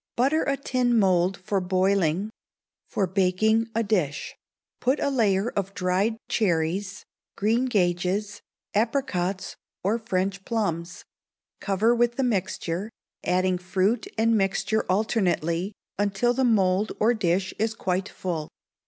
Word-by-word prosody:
Butter 275 +6 +2
a 275 0 0
tin 250 -3 +1
mould 185 -2 +3
for 195 +1 -1
boiling 185 +1 +1 0.6
for 195 - 0
baking, 195 +5 +2
a 230 - +2
dish. 180 -9 -1 0.4
Put 260 +4 +1
a 280 - 0
layer 215 -4 +2
of 195 0 -3
dried 195 +4 +1
cherries, 185 0 0 0.3
greengages, 205 -3 0 0.3
apricots, 205 -5 -1 0.3
or 210 +5 +1
French 195 -2 -2
plums; 180 -7 -3 0.5
cover 210 +4 +2
with 240 0 +2
the 270 - 0
mixture, 190 -3 -1 0.3
adding 185 0 +1
fruit 190 +5 0
and 225 +1 +3
mixture 200 +2 0
alternately, 185 -3 0 0.3
until 205 +4 +2
the 260 +2 0
mould 200 -3 +2
or 225 +3 +4
dish 190 -3 0
is 220 +1 0
quite 190 -1 -1
full. 165 -5 -4
195 Hz, 120 wpm, -25 LUFS, 185-225 Hz, 0.6 s, or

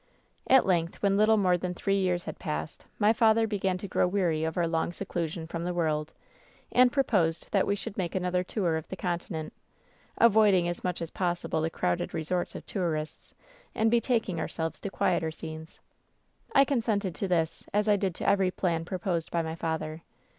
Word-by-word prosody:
"At 265 0 +6
length, 170 -1 0
when 200 -1 +3
little 215 +2 +4
more 180 -3 +3
than 180 0 -3
three 195 +2 0
years 180 -2 0
had - - -7
passed, 75 +1 -5
my 215 +1 +4
father 225 0 +4
began 195 -4 -1
to 200 - -6
grow 180 - +2
weary 175 -5 0
of 160 +1 -2
our 175 - +2
long 165 0 0
se - - -6
clusion 165 -1 -3
from 170 0 -4
the 180 0 -2
world, 155 -2 0 0.6
and 250 0 +5
proposed 195 - +1
that 195 - +2
we 200 - +2
should 200 0 -6
make 175 -1 -2
another 180 -1 0
tour 180 -4 -1
of 160 - -7
the - - -6
Continent 170 -3 -4 0.4
— - - -33
avoiding 205 -5 +4
as 175 0 -4
much 180 -2 -2
as 165 - -7
possible 175 -3 -1
the 160 - 0
crowded 90 - -1
resorts 175 +3 -2
of - - -7
tourists 160 -6 -3 0.4
and 220 0 +2
betaking 230 -7 +1
ourselves 165 0 -3
to 200 - -4
quieter 160 -3 0
scenes. 160 0 -9 0.8
"I 275 -1 +7
consented 220 - 0
to 195 - -3
this, 165 -3 0
as 210 +1 +1
I 210 - +5
did 195 -3 -1
to - - -4
every 195 -2 +3
plan 170 -3 -1
proposed 180 -2 -2
by 170 -1 0
my 160 0 -4
father. 160 -1 -3
180 Hz, 195 wpm, -28 LUFS, 165-200 Hz, 0.8 s, I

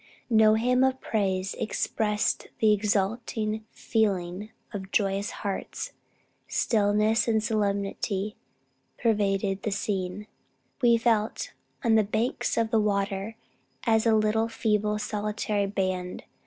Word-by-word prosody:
No 220 -1 +6
hymn 250 +3 +3
of 265 0 +2
praise 190 -3 -1
expressed 210 -1 0
the 215 -1 +4
exulting 215 +1 -1
feeling 200 -2 -1 0.2
of 190 -2 -5
joyous 200 0 +1 0.2
hearts. 195 -1 -3 0.6
Stillness 215 +1 +2
and 220 -2 +2
solemnity 200 -1 -1 0.6
pervaded 200 -3 +1
the - - -1
scene. 195 -1 -2 0.6
We 235 -2 +5
felt, 225 -2 0 0.3
on 230 -3 +3
the 220 -1 +5
banks 220 +4 -1
of 225 -1 +1
the 225 - +4
water, 200 +1 -1 0.5
as 225 -1 +3
a 225 - +5
little, 215 +1 +2
feeble, 210 -2 0
solitary 210 -1 -1
band. 185 -2 -2
210 Hz, 115 wpm, -27 LUFS, 200-220 Hz, 0.6 s, No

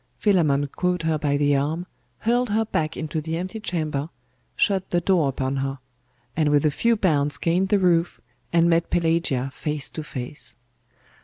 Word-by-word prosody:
Philammon 155 -9 +3
caught 180 +4 -1
her 160 -1 +1
by 145 -1 +1
the 145 0 +3
arm, 155 +5 -1 0.4
hurled 240 +1 +1
her 220 +2 +1
back 155 -7 -2
into 155 0 -3
the 160 +1 -3
empty 185 +6 -4
chamber, 155 -6 -2 0.5
shut 190 -2 +1
the 175 - +2
door 170 -5 +2
upon 135 0 -2
her; 135 0 -2 0.6
and 155 -2 +2
with 145 0 +3
a 150 - +4
few 230 +10 +2
bounds 150 -7 +2
gained 180 +3 +1
the 205 - +4
roof, 175 -3 +2 0.3
and 170 0 +4
met 170 0 +2
Pelagia 165 -6 0
face 150 -1 -3
to 155 - -5
face. 130 -3 -5
160 Hz, 170 wpm, -24 LUFS, 145-180 Hz, 0.6 s, a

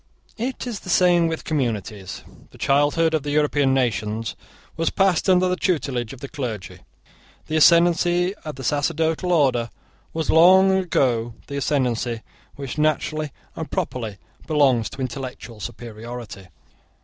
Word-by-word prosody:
It 255 +3 -3
is 235 -5 -4
the - - -11
same 175 -1 +4
with 160 -1 -3
communities. 110 - -3 0.3
The - - -17
childhood 145 +4 +2
of 160 - +1
the 145 - -5
European 145 -2 +2
nations 110 -3 -1 0.4
was 165 +1 0
passed 190 -1 +2
under 185 0 +4
the 180 - +1
tutelage 135 - -1
of 135 - -11
the 140 - -5
clergy. 120 -9 -6 0.7
The 155 - -3
ascendancy 175 +2 +4
of 155 -4 -6
the 135 - -8
sacerdotal 160 +6 0
order 130 -8 +2 0.4
was 160 -1 -1
long 190 +3 +6
the 120 -5 +1 0.2
ascendancy 125 -5 -1 0.3
which 140 +1 -6
naturally 155 0 0 0.2
and 160 - -5
properly 125 - -3 0.3
belongs 135 -7 +3
to 135 - -8
intellectual 125 -3 -6
superiority. 115 -2 -8
145 Hz, 135 wpm, -22 LUFS, 120-165 Hz, 0.7 s, long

